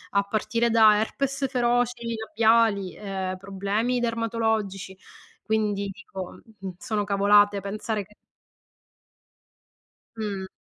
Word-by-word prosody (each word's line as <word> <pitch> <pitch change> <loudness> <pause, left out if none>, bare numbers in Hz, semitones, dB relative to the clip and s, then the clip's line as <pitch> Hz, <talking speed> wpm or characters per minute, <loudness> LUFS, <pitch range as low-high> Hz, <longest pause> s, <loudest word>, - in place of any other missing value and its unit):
a 200 - +4
partire 225 +3 0
da 220 -2 +6
herpes 270 +5 -1
feroci, 245 -2 0
labiali, 220 -4 +3
ehm, 190 -2 -4
problemi 200 +6 -1
dermatologici; 220 -5 -1 0.4
quindi 210 -1 0
dico, 195 -2 -9 0.2
uhm, 190 -1 -6
sono 215 -2 -2
cavolate 205 0 +4
pensare 210 +2 -3
che 210 - -22 2.0
Mh. 200 -3 -4
210 Hz, 95 wpm, -25 LUFS, 200-230 Hz, 2.0 s, da